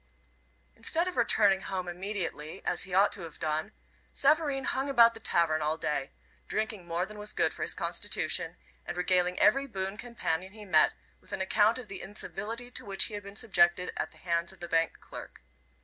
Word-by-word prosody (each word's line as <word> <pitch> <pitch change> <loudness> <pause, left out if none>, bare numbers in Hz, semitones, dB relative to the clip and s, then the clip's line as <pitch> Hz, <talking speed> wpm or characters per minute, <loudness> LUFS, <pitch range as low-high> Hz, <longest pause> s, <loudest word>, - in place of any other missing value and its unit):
Instead 325 +10 0
of 365 - -3
returning 205 -5 +4
home 185 -2 -4
immediately 175 -4 -5
as 180 - 0
he 185 - -9
ought 200 +2 +5
to 195 - -4
have 165 -3 -9
done, 155 +5 -2 0.4
Savareen 285 -1 +2
hung 270 +2 0
about 235 -4 +6
the 225 - -10
tavern 165 -6 +2
all 155 +1 0
day, 150 -4 -2 0.4
drinking 215 -4 -3
more 170 +2 0
than 210 +1 -11
was 210 0 -2
good - - +2
for - - -9
his - - 0
constitution, - - 0 0.3
and - - -6
regaling 180 0 +1
every 275 +1 +4
boon 195 -3 -4
companion 190 -6 -3
he 215 -1 -11
met 155 -5 +5 0.3
with - - -20
an - - -2
account 210 +4 +3
of 250 -3 -8
the 195 - -7
incivility 215 +5 -5
to - - -5
which 195 -1 +4
he 220 - 0
had 205 - -4
been 200 0 -11
subjected 180 -4 +2
at - - -2
the - - -16
hands 170 -1 0
of - - -16
the 175 - -6
bank 165 0 +1
clerk. - - -10
195 Hz, 195 wpm, -30 LUFS, 175-220 Hz, 0.4 s, about